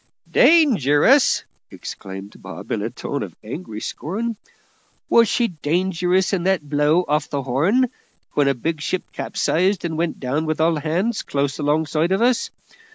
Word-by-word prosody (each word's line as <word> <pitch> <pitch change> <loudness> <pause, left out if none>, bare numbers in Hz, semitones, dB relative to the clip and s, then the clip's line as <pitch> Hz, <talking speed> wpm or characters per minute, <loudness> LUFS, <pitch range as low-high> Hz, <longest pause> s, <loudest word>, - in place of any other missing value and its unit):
"Dangerous!" 260 - +4 0.3
exclaimed 95 +1 -9
Bob, - - -9
in - - -1
a - - -2
tone - - -5
of - - -6
angry 110 -2 -7
scorn. 215 - -4 0.7
"Was 230 -1 +5
she 235 +2 +1
dangerous 180 +4 0
in 190 - +1
that 185 -6 +1
blow 150 +4 +2
off 150 0 0
the 140 -1 -3
Horn, 170 - +2 0.4
when 145 -1 +2
a 140 - +2
big 155 +5 -3
ship 185 +4 -2
capsized 185 +3 0
and 160 -2 -3
went 170 -1 -1
down 145 +5 -2
with 155 0 -1
all 160 0 +2
hands, 175 +9 -1
close 140 0 -2
alongside 155 +3 0
of 190 - +2
us? 245 0 +2
160 Hz, 155 wpm, -21 LUFS, 145-190 Hz, 0.7 s, Was